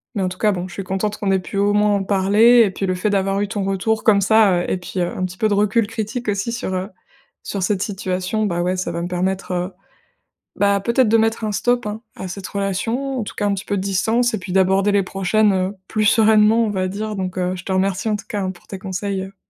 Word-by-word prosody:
Mais 200 - -1
en 185 - 0
tout 180 - -8
cas, 215 - +2
bon, 180 -2 -3
je 175 - -12
suis 195 - -5
contente 195 +3 -2
qu'on 200 -3 -1
ait 190 - +3
pu, 185 +2 -7
au 205 +1 +2
moins, 210 0 +3
en 200 - -1
parler 205 +5 +5
et 210 - +2
puis 195 - -3
le 185 - 0
fait 180 +4 -1
d'avoir 195 0 0
eu 205 - 0
ton 200 0 -3
retour 195 +3 0
comme 205 -3 +4
ça, 200 -2 +4
heu - - -3
et - - 0
puis, 180 +1 -6
heu, 175 - 0
un 185 - -1
petit 185 0 -7
peu 220 - +3
de 210 - +1
recul 210 +2 +2
critique 225 +2 -4
aussi 205 +3 -1
sur, 235 -5 -3
heu, 185 +2 -3 0.5
sur 195 -2 -3
cette 190 0 0
situation. 190 +1 -2
Bah, 175 -3 -1
ouais, 180 +1 0
ça 180 -1 -2
va 170 0 -3
me 175 - -3
permettre, 185 +2 -2
heu, 180 +1 -2 0.9
bah, 200 0 +3
peut-être 235 +4 +2
de 225 - +5
mettre 225 0 +1
un 215 - -1
stop, 245 +3 0
hein, 210 +1 -5
à 190 - -6
cette 190 +1 -6
relation. 225 +7 -2
En - - -1
tout - - -8
cas, 205 - -1
un 200 - +1
petit 195 +1 -5
peu 205 - -1
de - - -1
distance 225 +5 +1
et 215 - -1
puis 180 -1 -6
d'aborder 190 +1 +3
les 200 -1 +3
prochaines, 195 +3 +1
heu, 190 +1 -1
plus 215 -1 0
sereinement, 220 +1 +5
on - - -1
va 185 -2 -1
dire 210 +3 -4
donc 185 -1 -4
heu, 180 0 -1
je 180 - -9
te - - -4
remercie, 190 +3 0
en 210 - +1
tout - - -11
cas, 210 -5 -2
hein, 185 -1 -2
pour 180 - -17
tes 195 - -7
conseils, 190 +1 -3
heu 195 +1 -10
200 Hz, 275 wpm, -20 LUFS, 185-215 Hz, 0.9 s, parler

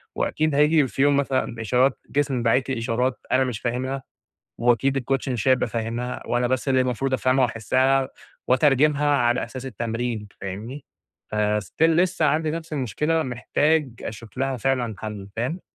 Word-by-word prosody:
وأكيد 155 -2 0
هييجي 150 -1 +4
في 135 - -3
يوم 145 0 +4
مثلًا، 130 -4 -1
إشارات 125 +4 +2
جسمي 135 -4 0
باعت 125 +3 +2
لي 130 - -1
إشارات 120 +3 -1
أنا 130 +1 +4
مش 125 -4 -3
فاهمها، 130 +3 -3 0.6
وأكيد 120 +3 +2
الcoach 135 +1 -1
مش 125 0 -1
هيبقى 130 -1 +3
فاهمها، 115 +2 -3
وأنا 120 0 +1
بس 130 +2 -1
اللي 130 -1 +3
مفروض 130 +2 -1
أفهمها 130 0 +3
وأحسّها 130 +3 +1 0.4
وأترجمها 145 +3 +3
على 120 -1 +2
أساس 130 0 -8
التمرين. 115 -2 -3
فاهمني؟ 110 +9 -6 0.5
فstill 105 - -1
لسّه 165 0 +3
عندي 155 +2 +1
نفس 165 0 -6
المشكلة، 150 +5 0
محتاج 145 +4 +1
أشوف 110 +2 -8
لها 135 -1 0
فعلًا 125 -2 0
حل. 105 -2 -6
فاهم؟ 130 +10 -2
130 Hz, 150 wpm, -24 LUFS, 120-140 Hz, 0.6 s, هييجي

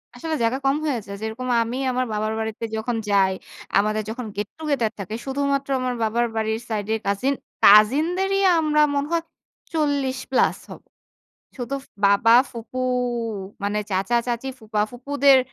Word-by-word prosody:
আসলে 320 +6 -4
জায়গা 230 +3 +1
কম 270 +1 +3
হয়ে 280 -5 0
যায়, 200 0 -7
যেরকম 220 +3 -4 0.2
আমি 240 +3 -4
আমার 255 0 0
বাবার 215 +1 -1
বাড়িতে 220 0 -4
যখন 225 +2 -2
যাই, 195 -2 +4 0.5
আমাদের 215 +1 0
যখন 240 +2 -5
গেট-টুগেদার 235 +2 -2
থাকে 200 +3 -5
শুধুমাত্র 275 0 -1
আমার 255 -1 -1
বাবার 235 +2 +1
বাড়ির 220 0 0
সাইডের 220 0 -1
কাজিন, 200 +8 +1 0.3
কাজিনদেরই 315 - +5 0.2
আমরা 300 -1 +2
মনে 280 +1 0
হয় 335 -1 +1 0.5
40+ 275 -4 +1
হব। - - -10 0.8
শুধু 270 +2 -4 0.2
বাবা, 200 +3 +5 0.2
ফুপু 235 +1 -8 0.8
মানে 205 +1 0
চাচা-চাচি, 235 +6 0
ফুপা-ফুপুদের 250 +6 +2
240 Hz, 130 wpm, -23 LUFS, 215-275 Hz, 0.8 s, কাজিনদেরই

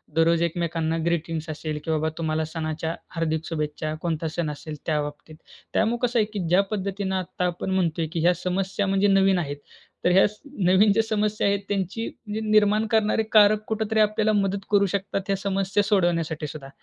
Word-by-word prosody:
दररोज 165 +1 +3
एकमेकांना 165 -1 -1
ग्रीटिंग्ज 165 -1 -1
असेल 155 0 -4
की 160 - -1
बाबा 155 0 +1
तुम्हाला 160 -1 -1
सणाच्या 160 0 -3 0.2
हार्दिक 160 -1 -1
शुभेच्छा, 155 -1 -3
कोणता 165 -1 -2
सण 170 -3 -1
असेल 150 +1 -7
त्याबाबतीत. 150 0 -3 0.4
त्यामुळं 225 +2 +2
कसं 240 0 0
आहे 215 - +3
की 205 - -2
ज्या 185 +3 +5
पद्धतीनं 195 -1 -2
आत्ता 185 -1 -2
आपण 175 +1 -2
म्हणतोय 170 -3 0
की 170 - -1
ह्या 175 +2 +4
समस्या 190 +2 -1
म्हणजे 195 +1 +2
नवीन 195 -1 +4
आहेत. 145 -4 -4 0.5
तर - - +5
ह्या 190 +2 +6
स 210 +1 -13 0.3
नवीन 190 +4 +5
ज्या 225 - +3
समस्या 215 -1 0
आहेत 200 0 +2
त्यांची 200 +3 -2
म्हणजे 215 0 -6
निर्माण 215 0 +4
करणारे 220 0 +2
कारक 210 0 +6
कुठेतरी 220 0 -1
आपल्याला 215 0 +3
मदत 200 -1 +1
करू 200 -1 +5
शकतात 195 0 -1
ह्या 195 - +1
समस्या 195 +1 0
सोडवण्यासाठी 170 -6 0
सुद्धा, 145 -2 -8
185 Hz, 180 wpm, -25 LUFS, 160-205 Hz, 0.5 s, ह्या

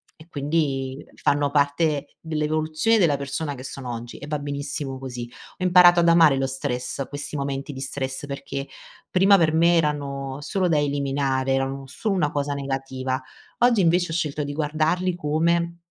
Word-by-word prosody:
e 155 - -16
quindi 140 -3 -1
fanno 145 0 +1
parte 145 +1 0
dell'evoluzione 155 +6 0
della 155 -6 +3
persona 140 +2 -3
che 130 - -9
sono 130 -1 -6
oggi 120 +1 -7
e 145 - -9
va 150 0 -1
benissimo 140 -1 -4
così.” 125 -2 -6 0.3
Ho - - -3
imparato 175 -1 +7
ad 170 - +4
amare 160 -5 +6
lo 135 - +1
stress, 130 0 -3
questi 145 +1 -6
momenti 140 +1 -3
di 135 - -8
stress 135 0 -4
perché 140 0 -5 0.4
prima 195 +2 +5
per 160 -3 +2
me 170 +2 +4
erano 140 -3 -2
solo 185 +5 0
da 165 -3 +2
eliminare 140 -2 0
erano 135 0 -2
solo 195 - -2
una 155 -5 +1
cosa 145 0 -1
negativa. 135 -2 -3 0.4
Oggi 240 -2 +4
invece 175 0 +2
ho - - -2
scelto 150 -2 -1
di 145 - -4
guardarli 160 +4 0
come, 170 +2 0
145 Hz, 165 wpm, -24 LUFS, 135-165 Hz, 0.4 s, imparato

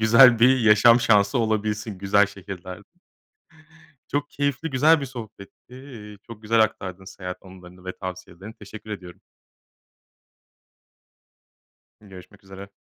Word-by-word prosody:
güzel 115 +2 +6
bir 130 +3 +5
yaşam 110 +2 +5
şansı 110 +2 +2
olabilsin, 110 -2 -2
güzel 100 +1 +2
şehirlerde. 95 -1 -10 1.2
Çok 145 0 -3
keyifli, 145 +2 -3
güzel 150 +4 +3
bir 140 - -5
sohbetti. 115 -1 -12
Eee, 115 -6 -12
çok 115 -2 -12
güzel 115 +1 +1
aktardın 95 -3 -4
seyahat 90 -1 -8
anılarını 90 -1 -15
ve 95 - -5
tavsiyelerini. 95 +2 -9
Teşekkür 110 0 -12
ediyorum. 90 -4 -9 2.8
Görüşmek 100 0 -15
üzere. 95 +1 -12
105 Hz, 110 wpm, -23 LUFS, 95-115 Hz, 2.8 s, güzel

